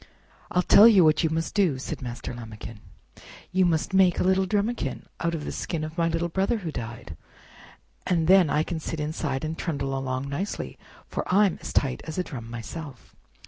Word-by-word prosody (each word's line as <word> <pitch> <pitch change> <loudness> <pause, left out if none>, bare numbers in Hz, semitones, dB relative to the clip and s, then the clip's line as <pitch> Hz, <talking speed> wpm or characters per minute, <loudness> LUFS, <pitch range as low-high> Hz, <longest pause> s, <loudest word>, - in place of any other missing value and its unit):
"I'll 180 - +1
tell 210 +4 +8
you 205 -6 +7
what 155 +1 +4
you 160 - +2
must 160 +1 -2
do," 185 -10 +2
said 130 - -5
Master 120 -1 -6
Lambikin, 115 -2 -9 0.7
"you 185 0 +3
must 165 +3 0
make 190 -2 +4
a - - +2
little 190 +1 +2
drumikin 205 - -1
out 170 -1 -1
of 150 - -5
the - - -3
skin 165 -3 -3
of 155 +1 -6
my 170 -1 +1
little 165 +1 0
brother 195 +7 0
who 175 -7 -5
died, 115 - -7 0.9
and 170 -3 +2
then 185 -2 +6
I 150 +2 +2
can 165 0 -4
sit 160 0 -5
inside 150 -2 -2
and 160 +1 -3
trundle 140 -6 -2
along 130 0 -3
nicely, 170 +9 -4 0.3
for - - -3
I'm 195 -1 +3
as - - -6
tight 135 -3 0
as 160 - -6
a 180 - +1
drum 120 -8 -8
myself." 120 +4 -8
160 Hz, 195 wpm, -26 LUFS, 135-180 Hz, 0.9 s, tell